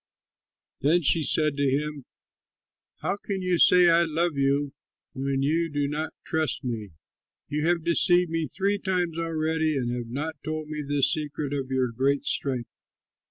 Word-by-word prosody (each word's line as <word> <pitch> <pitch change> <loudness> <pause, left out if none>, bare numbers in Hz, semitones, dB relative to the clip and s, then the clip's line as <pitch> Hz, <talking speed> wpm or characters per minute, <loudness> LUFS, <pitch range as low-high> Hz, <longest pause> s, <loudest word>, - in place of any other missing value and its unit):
Then 165 +5 +3
she 160 +3 +3
said 155 -1 +1
to 140 -1 +2
him, 145 0 -2 1.0
"How 200 - 0
can 195 -2 -4
you 180 -2 +1
say, 180 -1 +7
'I 170 0 +5
love 165 0 0
you,' 140 +1 +1 0.4
when 135 0 -1
you 165 +4 +1
do 145 -1 -1
not 150 +2 -2 0.2
trust 160 -1 -1
me? 110 -7 -4 0.6
You 150 +2 -1
have 170 -1 +1
deceived 175 +1 +3
me 165 -1 -1
three 200 +6 -1
times 180 -4 -1
already 160 -1 0
and 120 -2 -1
have 120 -1 -5
not 150 +6 -4
told 155 -1 -4
me 155 -1 -4
the 145 -1 -1
secret 150 -1 0
of 135 -2 -3
your 130 -2 0
great 135 +4 0
strength." 130 -4 -2
150 Hz, 160 wpm, -26 LUFS, 140-165 Hz, 1.0 s, say